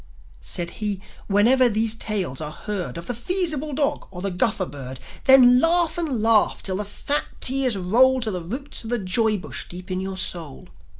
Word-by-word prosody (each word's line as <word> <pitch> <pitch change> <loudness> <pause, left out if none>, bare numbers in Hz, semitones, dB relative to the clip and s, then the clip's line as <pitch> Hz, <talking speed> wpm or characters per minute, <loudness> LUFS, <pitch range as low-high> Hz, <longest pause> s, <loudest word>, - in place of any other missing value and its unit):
Said 170 -2 -4
he: 205 -2 -2 0.3
"Whenever 240 +5 +4
these 220 0 +1
tales 200 - -3
are 150 - -3
heard 190 +1 -4
Of 170 - -7
the 245 - -2
Feasible 310 - -1
Dog 280 0 -1
or 180 -1 -9
the 195 - -1
Guffer 190 +1 0
Bird, 130 -4 -8 0.3
Then 250 -2 +7
laugh 335 +2 +3
and 295 -10 -2
laugh 225 -2 +3
till 185 -1 -1
the 210 - -3
fat 280 +8 -1
tears 260 -4 +2
roll 250 +8 +3
To 220 -2 -1
the 180 -2 -2
roots 255 - -4
of 225 - -7
the 240 - +1
joy 215 +2 +1
bush 180 - -6
deep 180 +2 -9
in 185 0 -2
your 190 0 -5
soul. 160 - -5
215 Hz, 190 wpm, -23 LUFS, 185-260 Hz, 0.3 s, Then